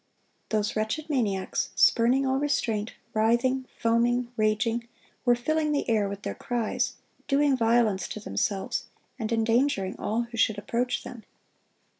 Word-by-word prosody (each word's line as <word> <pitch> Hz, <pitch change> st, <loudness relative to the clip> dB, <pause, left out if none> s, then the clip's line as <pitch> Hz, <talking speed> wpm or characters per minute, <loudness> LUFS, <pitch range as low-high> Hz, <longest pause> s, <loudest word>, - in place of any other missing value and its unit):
Those 215 Hz, -1 st, 0 dB
wretched 220 Hz, +9 st, -2 dB
maniacs, 205 Hz, -9 st, 0 dB
spurning 250 Hz, +4 st, +4 dB
all 265 Hz, 0 st, +1 dB
restraint, 225 Hz, -7 st, -1 dB, 0.2 s
writhing, 240 Hz, +4 st, +2 dB
foaming, 240 Hz, +1 st, +1 dB
raging, 225 Hz, +2 st, 0 dB, 0.4 s
were 245 Hz, -1 st, +5 dB
filling 305 Hz, +5 st, 0 dB
the 285 Hz, -, -1 dB
air 215 Hz, -4 st, +2 dB
with 200 Hz, 0 st, -7 dB
their -, -, -3 dB
cries, 240 Hz, -3 st, -1 dB, 0.3 s
doing 280 Hz, 0 st, +3 dB
violence 230 Hz, -4 st, +2 dB
to -, -, -6 dB
themselves, 195 Hz, -, -2 dB, 0.3 s
and 220 Hz, 0 st, -3 dB
endangering 225 Hz, -3 st, +1 dB
all 225 Hz, +3 st, 0 dB
who 235 Hz, 0 st, -9 dB
should 220 Hz, -2 st, +2 dB
approach 240 Hz, +4 st, -1 dB
them. 235 Hz, -3 st, -9 dB
230 Hz, 135 wpm, -27 LUFS, 215-250 Hz, 0.4 s, were